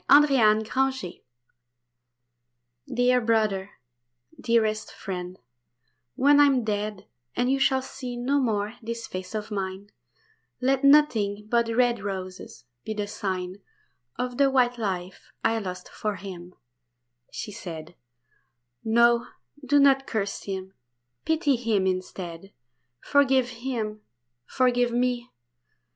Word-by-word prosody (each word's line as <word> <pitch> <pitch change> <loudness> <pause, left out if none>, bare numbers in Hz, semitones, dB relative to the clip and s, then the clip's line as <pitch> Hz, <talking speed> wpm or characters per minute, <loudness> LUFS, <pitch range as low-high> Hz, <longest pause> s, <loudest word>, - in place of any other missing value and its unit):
The 295 +1 +8 0.5
Miracle 265 -9 -2 1.7
"Dear 250 0 +3
brother, 215 -4 +1 0.7
dearest 220 -2 +1
friend, 180 -2 -6 0.8
when 285 +2 +5
I 290 - +8
am 265 -3 +2
dead, 210 -2 -3 0.3
And 245 +1 +1
you 275 - +1
shall 265 -1 +2
see 255 -2 -7
no 270 +4 +1
more 215 -3 -1
this 230 0 -5
face 185 +1 -7
of 215 +1 -4
mine, 195 0 -4 0.7
Let 265 +1 +1
nothing 220 -8 +4
but 235 -1 +2
red 240 0 +2
roses 185 -9 -6 0.2
be 220 - -4
the 210 -1 -2
sign 185 -2 -4 0.6
Of 250 -1 -3
the 280 -1 +5
white 245 -2 +2
life 185 -4 -4
I 225 0 +2
lost 180 -3 -6
for 210 -1 -3
him," 180 -2 -9 0.8
she 210 - -6
said; 170 -5 -8 0.9
"No, 235 +1 +4 0.4
do 290 +2 +3
not 270 -1 +4
curse 200 -2 -3
him, 190 -1 -5 0.5
pity 315 -3 +2
him 225 -5 0
instead; 185 -1 -4 0.5
Forgive 265 -3 +3
him! 230 -4 -4 0.5
forgive 245 -2 +2
me! 245 0 0
225 Hz, 115 wpm, -26 LUFS, 195-250 Hz, 1.7 s, The